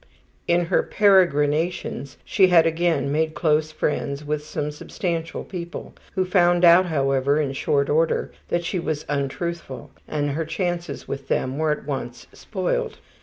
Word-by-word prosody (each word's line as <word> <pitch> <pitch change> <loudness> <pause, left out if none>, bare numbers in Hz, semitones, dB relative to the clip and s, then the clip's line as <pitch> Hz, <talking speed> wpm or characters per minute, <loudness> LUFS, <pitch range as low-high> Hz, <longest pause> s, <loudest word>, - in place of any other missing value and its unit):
In 175 0 +3
her - - +2
peregrinations 165 -7 +2
she 190 -3 +4
had 170 -3 +5
again 165 -3 +1
made 155 +1 0
close 155 -1 +1
friends 145 -1 -2
with 150 0 -2
some 150 0 -3
substantial 165 +2 -4
people, 175 -2 -7 0.2
who 185 -1 +1
found 175 -1 +4
out, 175 +2 +7
however, 140 -2 +1
in 140 -3 -1
short 140 +1 +1
order 160 +2 +1 0.2
that 175 0 -1
she 180 - -1
was 155 -2 -3
untruthful, 145 0 -4 0.2
and 145 -1 -1
her 160 +4 -1
chances 175 +1 -3
with 135 0 -6
them 130 +3 -1
were 160 0 +1
at 150 - -2
once 125 -4 -5
spoiled. 185 -4 -3
160 Hz, 150 wpm, -23 LUFS, 145-175 Hz, 0.2 s, out